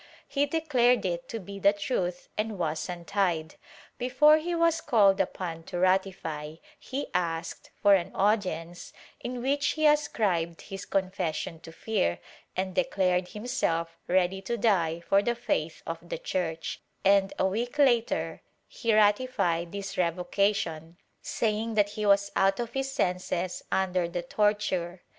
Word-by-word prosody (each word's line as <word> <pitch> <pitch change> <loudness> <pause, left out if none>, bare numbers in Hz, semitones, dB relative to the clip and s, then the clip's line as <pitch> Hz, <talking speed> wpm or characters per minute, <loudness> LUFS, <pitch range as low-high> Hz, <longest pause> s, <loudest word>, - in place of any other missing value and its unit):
He 285 +1 +1
declared 255 -7 +2
it 170 -1 -3
to 230 - -4
be 200 0 -8
the 200 +1 +5
truth 185 -4 -2
and 215 -1 -2
was 160 0 -2
untied. 175 -2 -1 0.5
Before 260 +5 +5
he 340 +2 -2
was 335 -1 +2
called 205 -9 +4
upon 175 -3 -4
to 175 - -5
ratify, 180 -5 0 0.2
he 275 +2 -5
asked 170 -2 -2
for 205 -1 +7
an 185 -3 +2
audience 180 -5 -1 0.3
in 245 0 -5
which 285 +2 +1
he 310 0 0
ascribed 200 - +2
his 195 -1 -8
confession 185 -4 -2
to 165 - -11
fear 165 - -1 0.4
and 185 0 -1
declared 180 -1 +1
himself 170 -7 -2
ready 185 +1 +2
to 235 +5 -3
die 170 -7 +1
for 195 +3 +3
the 240 +3 0
faith 165 -9 -2
of 165 0 -4
the - - -3
Church, 165 -3 -3 0.2
and 195 0 +4
a - - +2
week 230 +8 -2
later 240 -5 +2 0.3
he 230 -3 0
ratified 205 -6 +2
this 200 -1 -5
revocation, 175 -1 0 0.2
saying 220 0 -1
that 205 -1 +3
he 210 0 -3
was 200 0 +4
out 195 0 +3
of 235 -1 -3
his 270 0 -2
senses 180 -6 -1
under 185 -2 +1
the 175 0 -3
torture. 190 -3 0
195 Hz, 145 wpm, -28 LUFS, 175-225 Hz, 0.5 s, for